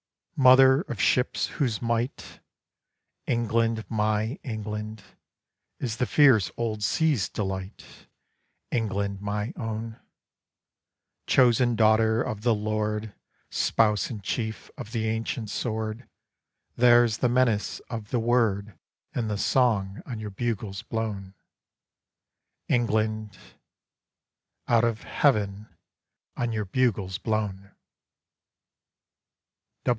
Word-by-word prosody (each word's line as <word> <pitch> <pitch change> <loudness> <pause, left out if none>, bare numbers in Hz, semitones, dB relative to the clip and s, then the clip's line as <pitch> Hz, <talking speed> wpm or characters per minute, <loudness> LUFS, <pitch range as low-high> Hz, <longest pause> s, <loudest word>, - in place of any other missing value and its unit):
Mother 130 0 +7
of 120 - -5
Ships 125 0 +2
whose 120 -8 +1
might, 115 +2 -2 0.9
England, 115 -1 0
my 110 +2 0
England, 110 -2 -5 0.8
Is 120 -3 -3
the 125 - 0
fierce 130 - +5
old 110 -2 -2
Sea's 145 - +1
delight, 95 -1 -6 0.6
England, 100 -4 -1
my 105 +2 -3
own, 110 0 -5 1.3
Chosen 120 -1 +4
daughter 110 +1 +3
of 110 -5 -4
the 120 0 +3
Lord, 105 0 -2 0.4
Spouse 105 -4 +2
in 110 -4 -6
Chief 110 +2 -4
of 110 - -8
the 110 -2 -1
ancient 110 0 -3
Sword, 110 +1 -3 0.7
There's 120 -2 +5
the 125 - +2
menace 120 -4 +1
of 110 -4 -7
the 125 - 0
Word 110 -4 +1 0.4
In 115 -3 -1
the 105 -1 -2
Song 105 -5 +1
on 120 -5 -5
your 105 -1 -6
bugles 100 -2 -3
blown, 105 -4 -4 1.3
England 110 -2 0 1.3
Out 115 -1 +4
of 115 -2 0
heaven 105 -6 +1 0.7
on 120 -1 -1
your 110 -2 -2
bugles 100 -4 0
blown! 105 -3 -3
110 Hz, 100 wpm, -26 LUFS, 105-120 Hz, 1.3 s, Mother